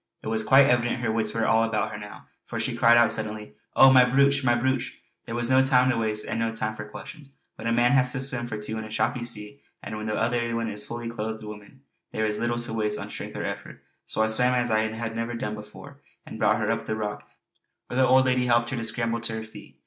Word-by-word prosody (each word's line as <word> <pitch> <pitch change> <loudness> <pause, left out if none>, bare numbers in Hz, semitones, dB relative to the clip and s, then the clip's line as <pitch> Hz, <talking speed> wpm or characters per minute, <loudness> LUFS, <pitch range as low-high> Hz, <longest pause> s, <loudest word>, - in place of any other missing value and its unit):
It - - -4
was 110 0 0
quite 135 +4 +6
evident 120 -1 +1
her 115 -2 0
wits 110 -1 0
were 115 -1 -1
all 110 +1 +3
about 115 -1 -1
her - - -6
now 105 0 -11 0.2
for - - -4
she - - -1
cried 120 0 +5
out 120 -2 +5
suddenly: 110 -6 -5 0.2
"Oh, 135 - +8
my 130 -1 +8
brooch! 140 +2 +3
my 120 -2 +3
brooch!" 130 +1 -1 0.3
There 115 - -5
was 120 +1 -1
no 130 0 +5
time 130 -1 +4
to 120 - -1
waste 110 -1 -1
and - - -3
no 115 0 -1
time 110 -1 -2
for 105 -1 -8
questions. 140 -4 -11 0.2
When - - -7
a - - +1
man 120 +1 +3
has 130 -2 +3
to 135 - -2
swim 130 -3 -1
for 105 -2 -5
two 110 +1 -3
in - - -5
a 110 - -9
choppy 110 +2 -1
sea, 115 +3 -4 0.2
and - - -6
when 110 0 -5
the 105 - -1
other 115 +1 0
one 115 -1 -2
is 105 0 0
a - - -6
fully 120 0 -5
clothed 110 -1 -5
woman, 105 +4 -11 0.3
there 110 - -2
is 105 -1 -2
little 120 0 -1
to 120 -1 -3
waste 105 -1 0
of - - -7
strength - - -7
or - - -3
effort. - - -7 0.2
So 110 - 0
I - - +2
swam 125 +3 +3
as 120 -2 0
I 110 - +3
had 110 0 -5
never 115 +1 -3
done, 105 -3 -4 0.6
and - - -9
brought 110 0 +3
her 110 0 0
up 115 0 -3
to - - -1
the - - -3
rock 105 -1 -5 0.6
where 125 - -6
the 130 - +5
old 130 +1 +5
lady 125 -1 +1
helped 120 0 +2
her 135 - -2
to 115 - -3
scramble 115 +1 -1
to 115 -1 -2
her 110 - -5
feet. 110 - -14
115 Hz, 270 wpm, -25 LUFS, 110-125 Hz, 0.6 s, Oh